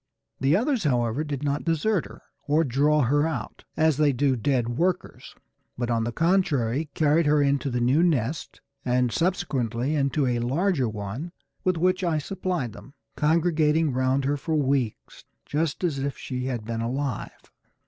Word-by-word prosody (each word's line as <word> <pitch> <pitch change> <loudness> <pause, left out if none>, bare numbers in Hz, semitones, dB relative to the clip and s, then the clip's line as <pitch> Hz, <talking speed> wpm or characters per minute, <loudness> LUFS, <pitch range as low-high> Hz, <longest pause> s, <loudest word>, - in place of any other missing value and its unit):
The 135 +3 +3
others, 250 -1 0
however, 125 -1 +1
did 145 -2 -4
not 145 0 -1
desert 170 +3 0
her, - - -14 0.2
or 150 +3 +3
draw 145 +3 +2
her 145 +5 +2
out 160 - -5
as 160 -3 +3
they 150 -1 +4
do 135 +1 +1
dead 125 0 0
workers, 175 +9 -2 0.4
but 120 -1 -2
on 115 -1 +1
the 120 - -2
contrary 155 -5 +1
carried 155 +1 +3
her 150 0 +4
into 140 -1 +1
the 125 -1 -1
new 130 +7 +3
nest, 155 -4 -1 0.2
and 125 -1 +1
subsequently 135 - -1
into 140 0 +1
a 120 -2 0
larger 135 - +1
one 110 - -6 0.3
with 185 -2 +1
which 185 +2 +1
I 170 -3 +1
supplied 175 - -3
them, 140 - -13 0.2
congregating 155 -1 +2
round 130 +1 +1
her 145 +1 +1
for 160 +3 -2
weeks 135 -6 -1 0.2
just 155 +2 -2
as 155 -6 0
if 140 0 -3
she 125 -1 -4
had 120 -5 -3
been 115 0 -3
alive. 130 0 -4
145 Hz, 165 wpm, -25 LUFS, 125-160 Hz, 0.4 s, they